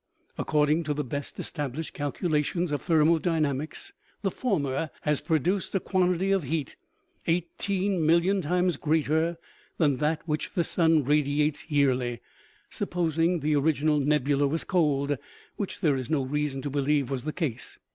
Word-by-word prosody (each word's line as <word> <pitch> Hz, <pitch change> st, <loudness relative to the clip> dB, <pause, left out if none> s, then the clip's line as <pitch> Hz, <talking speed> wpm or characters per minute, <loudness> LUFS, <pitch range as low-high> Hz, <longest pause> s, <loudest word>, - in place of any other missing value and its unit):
According 150 Hz, +1 st, +2 dB
to 150 Hz, 0 st, -1 dB
the 150 Hz, -, -1 dB
best 140 Hz, +2 st, -5 dB
established 150 Hz, 0 st, -4 dB
calcula 150 Hz, +2 st, 0 dB
tions 175 Hz, +2 st, -2 dB
of 145 Hz, -, -1 dB
thermodynamics, 160 Hz, -, +1 dB, 0.3 s
the 195 Hz, -, +1 dB
former 155 Hz, -, -1 dB
has 150 Hz, -2 st, +1 dB
produced 180 Hz, +5 st, 0 dB
a -, -, +3 dB
quantity 185 Hz, 0 st, +1 dB
of 195 Hz, -1 st, +3 dB
heat 150 Hz, +1 st, -3 dB, 0.5 s
eighteen 180 Hz, +2 st, 0 dB
million 170 Hz, +5 st, +3 dB
times 180 Hz, 0 st, +1 dB
greater 160 Hz, +2 st, +1 dB, 0.4 s
than 145 Hz, -5 st, +2 dB
that 155 Hz, +3 st, -1 dB
which 150 Hz, -1 st, -2 dB
the 175 Hz, -, +2 dB
sun 160 Hz, -3 st, +3 dB
radiates 150 Hz, +2 st, +1 dB
yearly, 130 Hz, -5 st, +1 dB, 0.5 s
supposing 170 Hz, 0 st, 0 dB
the 150 Hz, +1 st, +1 dB
orig 150 Hz, +2 st, +3 dB
inal 150 Hz, -1 st, +2 dB
nebula 145 Hz, -1 st, +2 dB
was 160 Hz, +4 st, -1 dB
cold, 145 Hz, -6 st, +1 dB, 0.4 s
which 200 Hz, -, -4 dB
there 150 Hz, -4 st, +3 dB
is 130 Hz, -2 st, -5 dB
no 150 Hz, -4 st, +1 dB
reason 140 Hz, 0 st, -2 dB
to 145 Hz, -, -3 dB
believe 140 Hz, -1 st, +1 dB
was 130 Hz, -3 st, -2 dB
the 155 Hz, -, -2 dB
case. 150 Hz, -9 st, -4 dB
155 Hz, 150 wpm, -27 LUFS, 145-170 Hz, 0.5 s, a